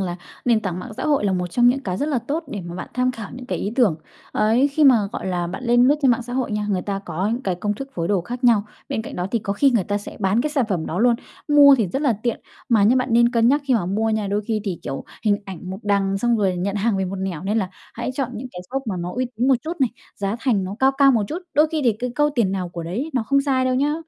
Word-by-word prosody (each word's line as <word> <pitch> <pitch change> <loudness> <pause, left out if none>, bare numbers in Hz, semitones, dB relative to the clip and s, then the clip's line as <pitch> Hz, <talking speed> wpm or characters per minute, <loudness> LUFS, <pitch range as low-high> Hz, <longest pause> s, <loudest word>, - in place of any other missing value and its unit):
là 175 -2 -2 0.3
nền 235 -3 +3
tảng 185 -4 -3
mạng 220 +5 -7
xã - - -4
hội 285 -8 +2
là 195 - +2
một 180 -1 -1
trong 240 +7 +3
những 270 +2 +2
cái 185 -5 -3
rất 290 - -1
là 275 -5 +1
tốt 290 +8 -3
để 205 - -5
mà 175 -1 -8
bạn 185 - -6
tham 255 0 +2
khảo 225 -4 -8
những 250 0 -9
cái - - -2
ý 205 - -3
tưởng. 220 - +3 0.4
Ấy, 230 +6 +3
khi 300 +2 +2
mà, 265 -3 +8 0.2
gọi - - -5
là, 175 -2 -1
bạn 190 +8 -6
lên 240 +1 +4
lướt 285 - +5
trên 265 - +5
mạng 240 0 +1
xã 245 +1 -8
hội 255 -3 -1
nha, 210 0 -1
người 185 -2 0
ta 195 +1 -3
có 185 -1 -3
những 245 +3 -3
cái 185 - -1
công 205 +4 -2
thức 270 +5 -7
phối 170 -1 -2
đồ 200 -3 +2
khác 245 +8 -6
nhau. 225 -4 +5 0.2
Bên 220 - -2
cạnh - - -8
đó 180 - -2
thì 235 - +1
có 200 -2 -3
khi 275 +7 +3
người 230 -7 +1
ta 205 +2 -1
sẽ 205 - -10
bán 195 +3 +2
cái 300 - -1
sản 280 -4 +1
phẩm 175 -5 -1
đó 175 - -3
luôn, 240 +2 +4 0.3
mua 285 -1 +8
thì 225 -6 +1
rất 270 - -2
là 275 -6 +3
tiện, 235 -2 -1 0.3
mà 225 -4 +4
nhá 225 +6 +5
bạn 255 0 0
nên 235 0 +5
cân 230 -1 +3
nhắc 285 +3 +3
khi 265 -3 +2
mà 185 -6 +1
mua 220 +4 0
nha. 215 -2 0
Đôi 205 +2 -1
khi 220 -2 0
thì, 185 -5 -3
kiểu, 135 - -5 0.2
hình 205 -1 +3
ảnh 185 -1 -8
một 190 - -5
đằng 195 -1 +1
xong 240 +1 +2
rồi 190 -4 +1
nhận 195 +3 -2
hàng 210 0 +1
về 190 - 0
một 190 +1 -4
nẻo 185 -4 -4
nên 210 +3 0
là 190 -4 -1 0.3
hãy 240 +3 -3
chọn 265 -2 -2
những 245 +4 -6
cái 180 - -7
shop 270 +1 -2
mà 195 - -2
nó 175 +1 -4
uy 255 +1 0
tín 245 +3 +1
một 270 - +6
chút 325 -1 -5
này, 255 - +3 0.3
giá 200 +2 -2
thành 220 -8 +1
nó 190 +2 -5
cao 265 +1 +4
cao 275 -1 +6
một 225 - +2
chút. 325 - -3 0.2
Đôi 300 +3 +5
khi 315 - 0
thì 235 - +4
cái 250 +1 -2
câu 295 +2 +2
"tiền 220 -7 +2
nào 185 -2 -2
của 170 -1 -6
đấy" 215 - -3
nó 250 - +1
không 275 +5 +2
sai 270 -2 +1
đâu 255 0 +1
nhá. 285 +3 +1
225 Hz, 315 wpm, -22 LUFS, 195-255 Hz, 0.4 s, mà